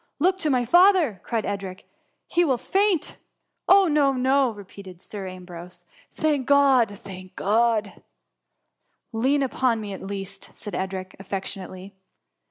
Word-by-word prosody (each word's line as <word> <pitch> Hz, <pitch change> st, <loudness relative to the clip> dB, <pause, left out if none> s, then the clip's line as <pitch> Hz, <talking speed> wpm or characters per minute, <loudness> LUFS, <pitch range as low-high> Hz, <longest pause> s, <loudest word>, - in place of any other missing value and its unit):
" -, -, -51 dB
Look 370 Hz, +5 st, +2 dB
to 315 Hz, -, 0 dB
my 250 Hz, -3 st, +2 dB
father,'' 350 Hz, -, +5 dB
cried 230 Hz, -3 st, -2 dB
Edric, 195 Hz, -2 st, -5 dB, 0.2 s
" -, -, -49 dB
he 350 Hz, -, +4 dB
will 270 Hz, -7 st, +2 dB
faint.''. 390 Hz, -, 0 dB
<^ -, -, -23 dB, 0.5 s
Oh 385 Hz, 0 st, +7 dB
no, 295 Hz, -3 st, +3 dB
no!" 265 Hz, +1 st, +2 dB
repeated 200 Hz, -3 st, -11 dB
Sir 195 Hz, 0 st, -8 dB
Ambrose: 180 Hz, -1 st, -10 dB, 0.3 s
'^ -, -, -26 dB
thank 295 Hz, -5 st, 0 dB
God! 265 Hz, -7 st, +4 dB
thank 185 Hz, -1 st, -11 dB
God 220 Hz, +1 st, +2 dB
I" -, -, -19 dB
^^ -, -, -29 dB, 1.1 s
Lean 270 Hz, +5 st, +2 dB
upon 255 Hz, -3 st, 0 dB
me, 205 Hz, -2 st, -6 dB
at 190 Hz, -, -8 dB
least," 195 Hz, 0 st, -7 dB
said 205 Hz, -, -8 dB
Edric, 190 Hz, 0 st, -4 dB
affec 195 Hz, 0 st, -4 dB
tionately. 185 Hz, 0 st, -8 dB
225 Hz, 165 wpm, -24 LUFS, 195-280 Hz, 1.1 s, Oh